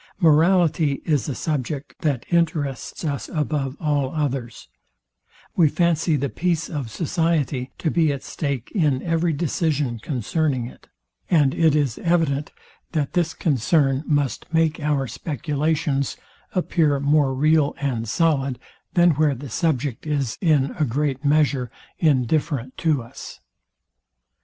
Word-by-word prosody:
Morality 160 -3 +3
is 145 -7 +1
a 135 - -3
subject 145 -1 -3
that 145 -7 -1
interests 160 -4 -1
us 140 -3 -3
above 150 -3 -2
all 145 -3 0
others: 135 -6 -3 0.9
We 165 -4 +5
fancy 170 -1 +1
the 140 0 0
peace 170 +2 -1
of 140 -7 -4
society 155 -2 -1
to 160 - -1
be 160 -3 +3
at 140 -2 -5
stake 140 -5 -4
in 150 -9 +1
every 165 0 +1
decision 150 -5 -1
concerning 130 +2 -1
it; 120 - -12 0.4
and 145 -6 +4
it 160 -3 +3
is 140 -6 0
evident, 160 -4 +1 0.4
that 150 -4 -1
this 170 -2 0
concern 140 0 +1
must 145 -2 -1
make 160 -1 +2
our 145 -3 0
speculations 145 +2 -1 0.4
appear 160 -5 +2
more 140 0 +3
real 150 +1 +3
and 120 -6 -2
solid, 140 -2 +1 0.4
than 175 -1 +6
where 150 -1 +2
the 130 0 -9
subject 145 -3 -1
is, 140 -6 -1
in 150 -6 +3
a - - +3
great 140 +1 -1
measure, 145 -4 +2 0.3
indifferent 140 -3 +1
to 155 -7 +1
us. 115 - -10
145 Hz, 130 wpm, -23 LUFS, 135-160 Hz, 0.9 s, than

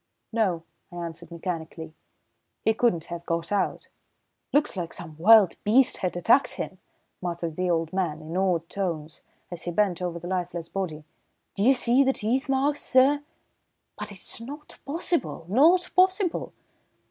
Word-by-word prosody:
"No," 190 -8 +1 0.3
I - - -11
answered 170 -1 -7
mechanically, 165 -2 -6 0.7
"he 220 - +4
couldn't 220 -8 +1
have 170 0 -7
got 165 +1 -2
out." 205 -2 -1 0.6
"Looks 295 -4 +2
like 175 -3 -4
some 160 -3 -8
wild 210 0 +6
beast 240 +5 +4
had 180 -1 -2
attacked 230 +10 +3
him," - - -6 0.4
muttered 170 -2 -3
the 180 +1 -1
old 165 -1 0
man, 175 -5 -1
in 160 +2 -8
awed 180 -3 +1
tones, 165 -6 -4 0.3
as 175 - -5
he 175 - -3
bent 185 -1 +1
over 175 -1 -3
the 170 +1 -8
lifeless 175 -2 -3
body. 165 -6 -4 0.5
"D'ye 215 +7 +4
see 250 +1 +5
the 270 0 +2
teeth 255 +5 -1
marks, 280 +2 +1
sir? 270 +3 +4 0.7
But - - -6
it's 200 +3 -3
not 290 +5 -10
possible 315 - -2
not 330 - +4
possible." 370 -1 +2
185 Hz, 150 wpm, -26 LUFS, 170-255 Hz, 0.7 s, wild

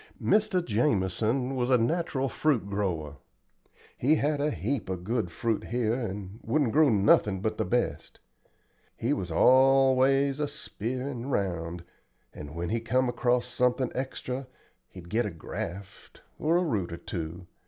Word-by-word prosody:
Mr. 205 -4 +2
Jamison 115 +3 0
was 125 -1 0
a 130 - +5
natural 135 +2 0
fruit 130 -5 0
grower. 90 -8 -2 0.8
He 145 +6 +3
had 145 -1 0
a 150 - +2
heap 110 - -3
of 90 -2 -4
good 110 -2 -1
fruit 115 +2 -1
here 115 -1 0
and 105 -4 -5
wouldn't 145 -6 +1
grow 155 +2 +5
nothin' 100 -2 +3
but 110 +2 -2
the - - +1
best. 120 0 -2 0.8
He 120 +5 0
was 95 -9 -3
always 135 - +4
a 150 - 0
speerin' 125 +1 -5
round, 85 -8 -2 0.5
and 75 +1 -9
when 85 0 -3
he 115 - 0
come 125 +3 +1
across 120 0 +1
something 125 0 0
extra 130 0 -4 0.4
he'd 90 -2 -12
get 115 +7 0
a - - -3
graft, 90 +4 -8 0.2
or 165 +3 +2
a 180 - +2
root 105 - -1
or 85 - -5
two. 85 -2 -6
120 Hz, 150 wpm, -28 LUFS, 95-135 Hz, 0.8 s, a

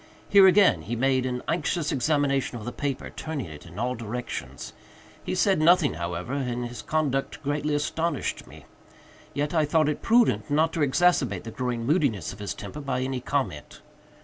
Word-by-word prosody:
Here 195 -1 +7
again 185 - +5
he 110 +9 -4
made 130 +1 +1
an 125 -1 -3
anxious 165 -1 0
examination 140 -2 +1
of 105 - -8
the 120 - -3
paper; 140 -1 -4
turning 155 -5 -5
it 75 -1 -11
in 85 +2 -12
all 125 +3 -1
directions. 120 +1 -6 0.5
He - - -2
said 190 -1 +3
nothing, 175 - +5
however, 85 +7 -4
and 125 -3 -2
his 120 -2 -8
conduct 140 -1 -1
greatly 145 +1 -1
astonished 160 +3 -2
me; - - -14 0.7
yet 145 +2 -1
I 160 -2 +3
thought 155 0 +2
it 150 - -3
prudent 230 -7 +3
not 155 +3 +2
to - - -3
exacerbate 150 -1 +2
the 115 - -7
growing 120 -1 -3
moodiness 135 - +1
of 100 - -13
his 100 -1 -4
temper 150 - -7
by 130 -3 -2
any 130 0 -2
comment. 130 - -3
135 Hz, 175 wpm, -26 LUFS, 120-155 Hz, 0.7 s, Here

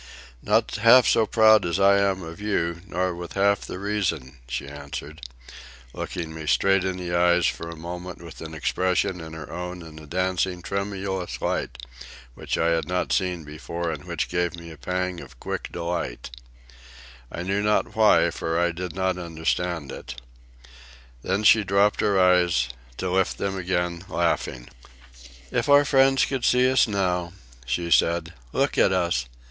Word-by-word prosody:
"Not - - +1
half 120 +2 +7
so 110 -1 +3
proud 110 -1 +5
as 85 +2 -1
I 100 0 +5
am 95 -2 +1
of 85 +4 -9
you, 85 -5 -1
nor 90 -1 -1
with 85 0 -8
half 100 0 +2
the - - -7
reason," 85 -10 -2
she 65 +2 -4
answered, 70 +2 -8 0.7
looking 80 -2 -5
me 80 -1 -7
straight 95 +6 +3
in 95 -1 -2
the 90 -1 -4
eyes 85 -1 +4
for 85 - -2
a 85 - -7
moment 90 +2 -7
with 85 -1 -11
an 80 0 -7
expression 90 +2 0
in 80 0 -9
her 80 - -8
own 90 0 -6
and 80 -1 -11
a 75 - -13
dancing, 90 +1 -1
tremulous 100 -2 -3
light 65 - -2 0.6
which - - -3
I 85 - +2
had 80 -2 0
not 90 0 -1
seen 90 -4 0
before 80 +3 -5
and 75 -2 -7
which - - -2
gave 90 0 -1
me 85 -1 -10
a - - -10
pang 90 0 -2
of - - -14
quick - - -5
delight, 85 -9 -4 1.0
I 85 - -5
know 100 +2 0
not 105 +1 +1
why, 95 -6 +5
for 80 +1 -2
I 85 0 +2
did 85 0 -6
not 95 -1 0
understand 80 -2 -2
it. 65 +1 -8 1.0
Then 95 - -1
she 105 +1 +6
dropped 100 +2 +2
her 100 -2 +2
eyes, 90 -8 +3 0.3
to 95 -1 -2
lift 95 0 +1
them 100 -1 -2
again, 90 -2 -2
laughing. 85 -7 -1 0.8
"If 120 +3 -1
our 145 0 +7
friends 135 -1 +4
could 135 -3 -3
see 125 +1 +4
us 130 - +4
now," 90 -4 -1 0.3
she 85 +5 -2
said. 85 0 +2 0.2
"Look - - 0
at - - +5
us. 85 -10 0
90 Hz, 170 wpm, -24 LUFS, 85-95 Hz, 1.0 s, half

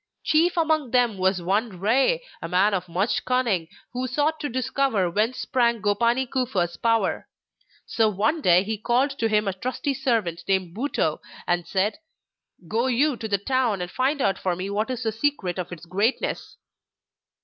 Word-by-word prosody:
Chief 335 +3 +2
among 315 -5 +1
them 240 -5 +2
was 185 -1 +1
one 195 +1 -1
Rei, 265 - +2 0.2
a 165 - -4
man 190 +4 +3
of 180 -2 -2
much 190 +7 0
cunning, 235 -10 0 0.3
who 255 +1 -2
sought 300 +5 0
to 295 -1 -3
discover 255 -6 0
whence 220 +7 0
sprang 235 -2 +1
Gopani 235 +5 +1
Kufa's 225 -10 -1
power. 230 -1 0 0.6
So 220 -1 +2
one 220 - 0
day 180 -5 +5
he 215 +1 -4
called 255 +5 +1
to 225 - +2
him 210 -1 +2
a 195 - 0
trusty 255 +8 -3
servant 225 -11 -1
named 190 -3 0
Butou, 280 +6 -1 0.3
and 175 -1 0
said: 205 +9 0 0.7
'Go 230 +6 0
you 265 +3 +2
to 225 - -5
the 200 -2 +1
town 240 -1 0
and 180 0 -5
find 270 +2 0
out 195 -1 +1
for 185 -2 -1
me 185 +3 -4
what 215 +4 -1
is 250 -1 -3
the 220 - 0
secret 220 -7 -1
of 180 0 -5
its 175 -1 -9
greatness. 200 +8 -1
225 Hz, 175 wpm, -24 LUFS, 190-260 Hz, 0.7 s, day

